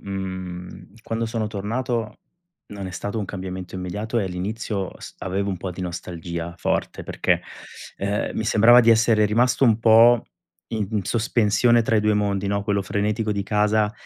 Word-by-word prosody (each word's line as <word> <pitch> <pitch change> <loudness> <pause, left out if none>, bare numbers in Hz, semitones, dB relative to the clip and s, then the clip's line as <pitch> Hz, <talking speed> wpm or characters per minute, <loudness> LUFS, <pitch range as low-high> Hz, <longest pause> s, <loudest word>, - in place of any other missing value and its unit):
Mhmm, 95 -1 -7
quando 115 0 -2
sono 110 -1 -2
tornato, 110 +2 -3 0.5
non 100 -2 -7
è - - -6
stato 100 +4 -4
un 105 - -2
cambiamento 95 -1 -6
immediato 105 +6 -3
e 95 - -1
l'inizio 95 +1 -3
s - - -10
avevo 100 +2 -2
un 95 - -3
po' 90 +1 -5
di 95 - -8
nostalgia 85 -1 -5
forte, - - -2
perché, - - 0 0.6
uhm, 100 +1 -1
mi 110 - -2
sembrava 115 +3 +6
di 115 -1 +4
essere 110 -1 +4
rimasto 125 +5 +2
un 115 -3 +4
po' 115 +1 +6 0.5
i 110 -3 -1
in 105 -2 -1
sospensione 115 +1 +2
tra 110 0 +1
i - - +3
2 105 0 +2
mondi, 100 -1 0
no, 100 0 0
quello 100 0 0
frenetico 105 +2 -1
di 100 -1 -2
casa 105 +1 +1
105 Hz, 170 wpm, -23 LUFS, 95-110 Hz, 0.6 s, sembrava